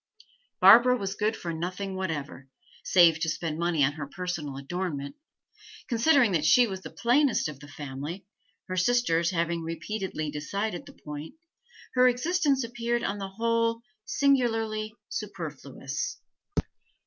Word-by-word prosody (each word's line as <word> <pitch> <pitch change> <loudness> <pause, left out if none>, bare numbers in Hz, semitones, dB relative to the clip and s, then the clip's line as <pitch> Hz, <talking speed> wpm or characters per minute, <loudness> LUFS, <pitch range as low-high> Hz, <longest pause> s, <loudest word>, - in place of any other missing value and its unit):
Barbara 250 +1 +8
was 195 -3 -3
good 215 +2 -1
for 170 -1 -4
nothing 185 +4 -4
whatever, 145 -7 -4 0.3
save 170 -3 +5
to 160 - 0
spend 160 0 -3
money 170 -3 +2
on 135 - +3
her 145 -1 -6
personal 160 -5 -4
adornment; 140 -1 -4 0.7
considering 245 -1 +4
that 165 -4 +1
she 245 +10 +6
was 190 -4 -5
the - - -8
plainest 250 - +2
of 150 -3 -8
the 145 - -12
family 145 +6 -7 0.4
her 185 - -3
sisters 180 -5 +2
having 170 -1 -1
repeatedly 165 -1 -4
decided 175 +6 -3
the - - -12
point 150 +1 -8 0.6
her 255 0 +5
existence 280 +2 +2
appeared 235 0 -2
on 205 +1 -2
the 195 -1 -4
whole 230 +2 0 0.2
singularly 225 -5 +1
superfluous. 150 -8 -5
185 Hz, 135 wpm, -28 LUFS, 155-230 Hz, 0.7 s, Barbara